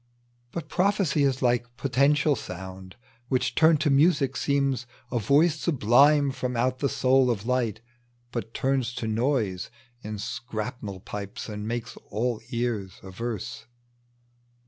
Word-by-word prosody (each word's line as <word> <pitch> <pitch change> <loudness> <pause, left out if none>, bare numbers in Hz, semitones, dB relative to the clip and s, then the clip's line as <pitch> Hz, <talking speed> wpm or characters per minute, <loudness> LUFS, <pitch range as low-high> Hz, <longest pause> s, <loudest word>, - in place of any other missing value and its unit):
But 165 -3 -5
prophecy 185 -5 +1
is 135 -2 +1
like 120 0 +1
potential 140 +2 +3
sound 95 -2 -8 0.3
Which 130 -1 0
turned 160 -1 +5
to 150 - +2
music 140 -2 +3
seems 135 -3 0 0.2
a 120 - +1
voice 150 - +3
sublime 140 0 +4
From 125 -2 -3
out 130 +2 +1
the 140 - +1
soul 130 0 +3
of 110 -3 -1
light; 120 -4 0 0.5
but 115 -2 -4
turns 130 -2 0
to 115 - -3
noise 110 -5 0 0.3
In 105 -1 -5
scrannel 110 -2 -5
pipes, 100 0 -6
and 105 0 -5
makes 120 0 -4
all 115 +2 -1
ears 115 -6 -2
averse. 115 +7 -5
125 Hz, 130 wpm, -26 LUFS, 110-140 Hz, 0.5 s, turned